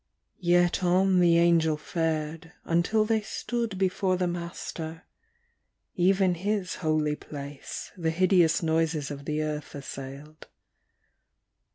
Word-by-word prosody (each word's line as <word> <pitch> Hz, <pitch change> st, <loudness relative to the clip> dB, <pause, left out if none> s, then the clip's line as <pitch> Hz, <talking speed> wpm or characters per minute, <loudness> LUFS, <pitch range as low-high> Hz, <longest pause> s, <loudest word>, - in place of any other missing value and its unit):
Yet 175 Hz, +1 st, +3 dB
on 185 Hz, +1 st, +3 dB
the 170 Hz, -1 st, +5 dB
Angel 165 Hz, -2 st, +3 dB
fared, 160 Hz, +1 st, -3 dB
until 180 Hz, +6 st, +2 dB
they 220 Hz, 0 st, +1 dB
stood 230 Hz, -1 st, -3 dB
Before 185 Hz, 0 st, +1 dB
the 180 Hz, -, 0 dB
Master. 170 Hz, -1 st, -5 dB, 0.9 s
(Even 185 Hz, +1 st, +3 dB
His 195 Hz, +2 st, -2 dB
holy 155 Hz, -2 st, +1 dB
place 140 Hz, -1 st, -8 dB
The 165 Hz, -4 st, -1 dB
hideous 175 Hz, -1 st, +3 dB
noises 160 Hz, -2 st, 0 dB
of 140 Hz, 0 st, -7 dB
the 155 Hz, +1 st, -1 dB
earth 150 Hz, -1 st, -4 dB
assailed.) 140 Hz, +2 st, -9 dB
170 Hz, 110 wpm, -27 LUFS, 155-185 Hz, 0.9 s, the